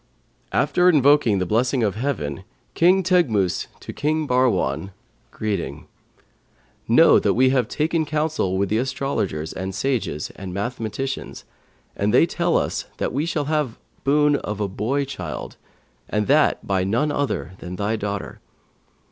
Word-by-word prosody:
'After 180 Hz, 0 st, +3 dB
invoking 145 Hz, -, +4 dB
the 90 Hz, -, 0 dB
blessing 120 Hz, +5 st, +1 dB
of 105 Hz, -3 st, +1 dB
Heaven, 100 Hz, -, -3 dB, 0.3 s
King 185 Hz, +3 st, +4 dB
Teghmus 130 Hz, -, +2 dB
to -, -, -8 dB
King 155 Hz, +1 st, 0 dB
Bahrwan, 100 Hz, -, +1 dB, 0.4 s
greeting. 95 Hz, -10 st, -4 dB, 1.0 s
Know -, -, +6 dB
that -, -, +1 dB
we 130 Hz, +2 st, +4 dB
have 125 Hz, -4 st, +2 dB
taken 160 Hz, +4 st, 0 dB
counsel 150 Hz, -, 0 dB
with 100 Hz, 0 st, 0 dB
the 110 Hz, -, +1 dB
astrologers 125 Hz, -, -2 dB
and 95 Hz, +1 st, -5 dB
sages 110 Hz, -, -2 dB
and 95 Hz, -2 st, -8 dB
mathematicians, 120 Hz, +5 st, -4 dB, 0.5 s
and 100 Hz, +1 st, 0 dB
they 125 Hz, +7 st, +5 dB
tell 170 Hz, 0 st, 0 dB
us -, -, -2 dB
that -, -, -2 dB
we 145 Hz, +5 st, -1 dB
shall 150 Hz, -3 st, -1 dB
have 150 Hz, -6 st, -1 dB, 0.3 s
boon 145 Hz, +1 st, +3 dB
of 105 Hz, -4 st, -5 dB
a 105 Hz, -, 0 dB
boy 120 Hz, +9 st, -1 dB
child, 95 Hz, -, -6 dB, 0.5 s
and 105 Hz, 0 st, 0 dB
that 150 Hz, +5 st, +3 dB
by 95 Hz, -2 st, +1 dB
none 120 Hz, +10 st, +1 dB
other 145 Hz, -10 st, -2 dB
than 90 Hz, +1 st, -7 dB
thy 105 Hz, +3 st, -1 dB
daughter. 100 Hz, -2 st, -4 dB
125 Hz, 145 wpm, -22 LUFS, 100-145 Hz, 1.0 s, Know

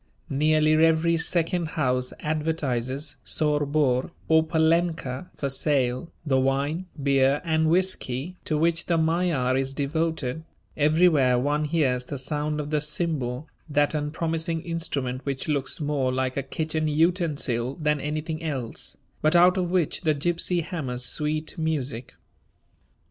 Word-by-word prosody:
Nearly 155 Hz, +2 st, +3 dB
every 165 Hz, +1 st, +4 dB
second 170 Hz, +1 st, 0 dB
house 125 Hz, 0 st, +1 dB
advertises 150 Hz, -4 st, -2 dB
"Sor 150 Hz, -2 st, 0 dB
Bor" 140 Hz, -4 st, +1 dB, 0.2 s
or 160 Hz, 0 st, +5 dB
"Palenka" 160 Hz, -2 st, 0 dB
for 140 Hz, -, -1 dB
sale 135 Hz, 0 st, 0 dB
the 135 Hz, -3 st, +2 dB
wine, 140 Hz, +7 st, 0 dB, 0.2 s
beer, 135 Hz, 0 st, +3 dB
and 160 Hz, -1 st, +2 dB
whiskey 175 Hz, -3 st, 0 dB
to 155 Hz, -, 0 dB
which 165 Hz, +2 st, +1 dB
the 170 Hz, -, +2 dB
Magyar 160 Hz, -6 st, +1 dB
is 135 Hz, 0 st, -1 dB
devoted; 160 Hz, -1 st, -1 dB, 0.3 s
everywhere 150 Hz, -4 st, +4 dB
one 145 Hz, +4 st, 0 dB
hears 140 Hz, -6 st, +1 dB
the 140 Hz, -, -5 dB
sound 150 Hz, +3 st, -2 dB
of 150 Hz, 0 st, -4 dB
the 150 Hz, -1 st, +1 dB
cymbal, 150 Hz, -3 st, -2 dB, 0.2 s
that 145 Hz, 0 st, +2 dB
unpromising 160 Hz, +2 st, -2 dB
instrument 140 Hz, -7 st, -3 dB
which 135 Hz, -1 st, -3 dB
looks 140 Hz, -3 st, -1 dB
more 145 Hz, -4 st, 0 dB
like 130 Hz, 0 st, -1 dB
a 140 Hz, -, 0 dB
kitchen 155 Hz, +3 st, -2 dB
utensil 150 Hz, -6 st, 0 dB
than 150 Hz, -2 st, +1 dB
anything 155 Hz, +2 st, -3 dB
else, 135 Hz, -7 st, -4 dB, 0.2 s
but 155 Hz, +2 st, +3 dB
out 180 Hz, +1 st, +6 dB
of 180 Hz, -2 st, 0 dB
which 175 Hz, -4 st, 0 dB
the 155 Hz, -4 st, +2 dB
gypsy 175 Hz, +3 st, 0 dB
hammers 130 Hz, -8 st, -2 dB
sweet 155 Hz, +3 st, -2 dB
music. 140 Hz, -6 st, -3 dB
150 Hz, 135 wpm, -25 LUFS, 135-160 Hz, 0.3 s, out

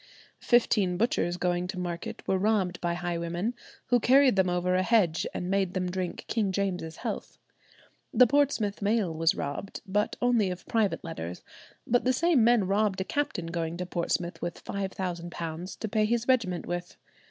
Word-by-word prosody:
Fifteen 210 Hz, -7 st, +3 dB
butchers 175 Hz, -5 st, +1 dB
going 180 Hz, 0 st, 0 dB
to 185 Hz, 0 st, -5 dB
market 175 Hz, -2 st, -5 dB
were 190 Hz, -, +2 dB
robbed 195 Hz, -3 st, +1 dB
by 170 Hz, -1 st, 0 dB
highwaymen, 175 Hz, +4 st, -2 dB, 0.4 s
who 245 Hz, -, +4 dB
carried 260 Hz, 0 st, +5 dB
them 190 Hz, -2 st, +3 dB
over 180 Hz, +1 st, 0 dB
a 185 Hz, -, +3 dB
hedge 185 Hz, -6 st, +2 dB
and 180 Hz, -, -4 dB
made 195 Hz, -1 st, 0 dB
them 180 Hz, -1 st, -1 dB
drink 185 Hz, -1 st, -4 dB
King 210 Hz, -4 st, 0 dB
James's 180 Hz, -4 st, -2 dB
health. -, -, -5 dB, 0.7 s
The 250 Hz, -, +7 dB
Portsmouth 250 Hz, -7 st, +1 dB
mail 205 Hz, -4 st, +1 dB
was 165 Hz, 0 st, +2 dB
robbed, 145 Hz, +8 st, -5 dB
but 205 Hz, +2 st, 0 dB
only 240 Hz, -5 st, +2 dB
of 180 Hz, 0 st, -6 dB
private 220 Hz, -3 st, 0 dB
letters; 90 Hz, -, -6 dB, 0.4 s
but 245 Hz, +1 st, +2 dB
the 255 Hz, -, +2 dB
same 310 Hz, -2 st, +3 dB
men 235 Hz, -3 st, +4 dB
robbed 200 Hz, 0 st, +1 dB
a -, -, 0 dB
captain 235 Hz, -7 st, -2 dB
going 165 Hz, 0 st, -3 dB
to 180 Hz, -, -3 dB
Portsmouth 175 Hz, 0 st, -2 dB
with 175 Hz, -1 st, -5 dB
£5,000 175 Hz, -3 st, -4 dB
to 220 Hz, -, -3 dB
pay 215 Hz, 0 st, +2 dB
his 235 Hz, +2 st, 0 dB
regiment 220 Hz, -9 st, +1 dB
with. 175 Hz, 0 st, -5 dB
185 Hz, 170 wpm, -28 LUFS, 175-220 Hz, 0.7 s, The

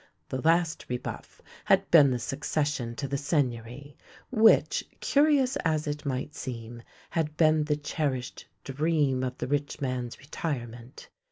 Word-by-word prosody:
The 130 Hz, -, -3 dB
last 165 Hz, 0 st, +1 dB
rebuff 125 Hz, 0 st, -6 dB, 0.2 s
had -, -, +3 dB
been 150 Hz, -5 st, +8 dB
the 125 Hz, -, 0 dB
succession 135 Hz, -1 st, -2 dB
to 140 Hz, -, -3 dB
the 140 Hz, +1 st, -2 dB
Seigneury, 140 Hz, -2 st, -2 dB, 0.4 s
which, 225 Hz, -3 st, +4 dB, 0.2 s
curious 285 Hz, -3 st, +3 dB
as 155 Hz, -2 st, 0 dB
it 145 Hz, -1 st, -4 dB
might 135 Hz, +2 st, -3 dB
seem, 120 Hz, -4 st, -7 dB, 0.3 s
had 155 Hz, -2 st, -2 dB
bee 155 Hz, -1 st, +4 dB
the 150 Hz, 0 st, 0 dB
cherished 145 Hz, -4 st, -3 dB, 0.2 s
dream 145 Hz, -2 st, +1 dB
of 130 Hz, 0 st, -3 dB
the -, -, -3 dB
rich 145 Hz, +2 st, -2 dB
man's 125 Hz, -3 st, -3 dB
retirement. 125 Hz, -4 st, -6 dB
145 Hz, 140 wpm, -28 LUFS, 125-155 Hz, 0.4 s, been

